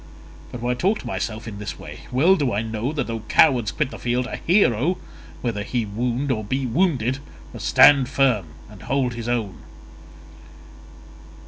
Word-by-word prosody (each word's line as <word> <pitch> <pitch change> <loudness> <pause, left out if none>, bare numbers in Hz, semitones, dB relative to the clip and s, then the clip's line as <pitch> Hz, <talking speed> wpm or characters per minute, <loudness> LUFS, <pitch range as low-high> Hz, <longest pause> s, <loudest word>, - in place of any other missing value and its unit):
But 120 - -7
why 125 +1 0
talk 190 - +1
to - - -14
myself 110 +1 -4
in 100 -2 -7
this 105 0 -6
way? - - -10
Well 155 +10 +4
do 140 -8 0
I 105 +2 0
know 110 +4 -3
that 155 - -2
though 115 -1 -4
cowards 125 -8 +4
quit 150 -3 -2
the - - -9
field, 120 +1 -1
a 125 - -5
hero, 175 - +2 0.4
whether 115 -4 -2
he 115 +2 -2
wound 120 +6 -2
or 110 -3 -1
be 130 +6 -2
wounded, 130 - +1 0.3
must - - -5
stand 135 -3 +6
firm 130 -9 +2 0.2
and 105 -3 -14
hold 130 -2 -1
his 115 0 -5
own." 110 -7 -2
120 Hz, 175 wpm, -22 LUFS, 110-135 Hz, 0.4 s, stand